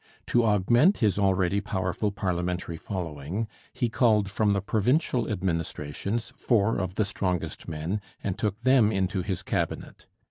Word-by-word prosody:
To 120 Hz, -, +3 dB
augment 120 Hz, -, +4 dB
his 105 Hz, -3 st, +2 dB
already 95 Hz, 0 st, +2 dB
powerful 95 Hz, 0 st, -1 dB
parliamentary 90 Hz, -3 st, -2 dB
following 85 Hz, +2 st, -4 dB, 0.2 s
he 120 Hz, -, -1 dB
called 110 Hz, -4 st, +2 dB
from 105 Hz, 0 st, +2 dB
the 100 Hz, -, +1 dB
provincial 120 Hz, -, +1 dB
administrations 90 Hz, +2 st, -2 dB
four 115 Hz, -2 st, +2 dB
of 95 Hz, -1 st, -3 dB
the 110 Hz, -, +2 dB
strongest 90 Hz, -3 st, -3 dB
men 80 Hz, +6 st, -3 dB, 0.2 s
and 95 Hz, -2 st, -1 dB
took 105 Hz, 0 st, -2 dB
them 125 Hz, -4 st, +5 dB
into 95 Hz, -1 st, 0 dB
his 95 Hz, 0 st, -3 dB
Cabinet. -, -, -3 dB
100 Hz, 140 wpm, -27 LUFS, 90-110 Hz, 0.2 s, them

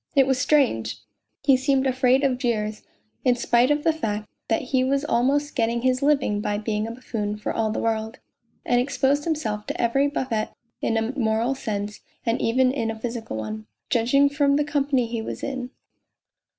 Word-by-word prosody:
It 270 Hz, -1 st, +6 dB
was 265 Hz, -1 st, +1 dB
strange! 115 Hz, -, +2 dB, 0.5 s
He 275 Hz, -2 st, +6 dB
seemed 265 Hz, +1 st, +1 dB
afraid 260 Hz, +1 st, +3 dB
of 260 Hz, -2 st, +1 dB
jeers, 215 Hz, -4 st, -1 dB, 0.4 s
in 250 Hz, -1 st, +4 dB
spite 240 Hz, +1 st, +3 dB
of 295 Hz, 0 st, +1 dB
the 325 Hz, -, +3 dB
fact 215 Hz, -9 st, -3 dB, 0.2 s
that 225 Hz, -, +1 dB
he 255 Hz, -1 st, +4 dB
was 275 Hz, +2 st, +1 dB
almost 290 Hz, +2 st, +1 dB
getting 235 Hz, 0 st, 0 dB
his 255 Hz, 0 st, +2 dB
living 275 Hz, -8 st, +2 dB
by 205 Hz, 0 st, -1 dB
being 215 Hz, 0 st, -2 dB
a -, -, -5 dB
buffoon 220 Hz, -4 st, -4 dB
for 210 Hz, -, -3 dB
all 220 Hz, -1 st, 0 dB
the 215 Hz, -, -3 dB
world, 220 Hz, +1 st, -1 dB, 0.5 s
and 245 Hz, 0 st, +3 dB
exposed 280 Hz, +2 st, +1 dB
himself 225 Hz, -11 st, -2 dB
to -, -, -4 dB
every 270 Hz, +4 st, +2 dB
buffet 255 Hz, -6 st, -2 dB, 0.3 s
in 225 Hz, -, +1 dB
a 225 Hz, +3 st, -1 dB
moral 225 Hz, +2 st, +1 dB
sense 210 Hz, -5 st, -4 dB, 0.3 s
and 230 Hz, 0 st, 0 dB
even 255 Hz, +2 st, +3 dB
in 230 Hz, -5 st, -1 dB
a 225 Hz, 0 st, -5 dB
physical 230 Hz, -, -4 dB
one, 110 Hz, 0 st, -5 dB, 0.2 s
judging 250 Hz, +5 st, +4 dB
from 280 Hz, 0 st, +2 dB
the 295 Hz, -, +2 dB
company 280 Hz, -4 st, +1 dB
he 230 Hz, 0 st, -3 dB
was -, -, -6 dB
in. 255 Hz, -2 st, -3 dB
245 Hz, 185 wpm, -24 LUFS, 220-275 Hz, 0.5 s, It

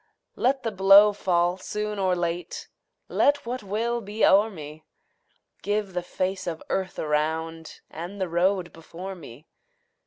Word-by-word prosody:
Let 265 Hz, +2 st, +1 dB
the 225 Hz, -, -1 dB
blow 200 Hz, +1 st, +7 dB
fall 180 Hz, -2 st, +1 dB
soon 210 Hz, +2 st, -4 dB
or 185 Hz, -2 st, +2 dB
late, 175 Hz, 0 st, -3 dB, 0.4 s
Let 285 Hz, -1 st, +2 dB
what 250 Hz, +2 st, -4 dB
will 230 Hz, +4 st, -2 dB
be 210 Hz, +1 st, 0 dB
o'er 205 Hz, +3 st, +5 dB
me; 155 Hz, -4 st, -10 dB, 0.8 s
Give 205 Hz, -2 st, -2 dB
the 180 Hz, -, -1 dB
face 185 Hz, +2 st, -3 dB
of 165 Hz, -2 st, -4 dB
earth 190 Hz, -1 st, -2 dB
around 160 Hz, +2 st, -2 dB
And 175 Hz, +5 st, -8 dB
the 190 Hz, -, -1 dB
road 175 Hz, +1 st, 0 dB
before 175 Hz, +4 st, -8 dB
me. 150 Hz, -5 st, -12 dB
185 Hz, 145 wpm, -25 LUFS, 170-205 Hz, 0.8 s, blow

